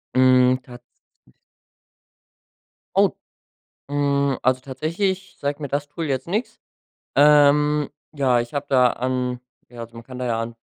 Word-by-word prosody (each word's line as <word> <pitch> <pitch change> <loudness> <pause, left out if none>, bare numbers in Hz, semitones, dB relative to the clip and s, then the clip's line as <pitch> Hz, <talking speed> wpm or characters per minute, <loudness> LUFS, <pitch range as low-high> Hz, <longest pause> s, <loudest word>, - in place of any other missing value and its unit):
Mhm, 130 0 +5
tatsächlich 120 -1 -15 2.0
Oh. - - +5 0.8
Hm, 140 -2 +1
also 130 0 +1
tatsächlich, 170 +9 -3
sagt 145 +1 -3
mir 145 - -4
das 145 +1 -2
Tool 160 +2 -5
jetzt 130 -1 -2
nix. 215 +7 -3 0.6
Ähm, 150 0 +4 0.2
ja, 130 -5 +2
ich 120 +4 -7
habe 145 0 -2
da 130 -2 +5
an 125 0 -2 0.3
ja, 120 -1 -11
also, 115 0 -9
man 115 - -9
kann 130 0 -10
da 130 - -3
ja 115 -1 -1
an, 115 0 -5
135 Hz, 140 wpm, -22 LUFS, 125-145 Hz, 2.0 s, Mhm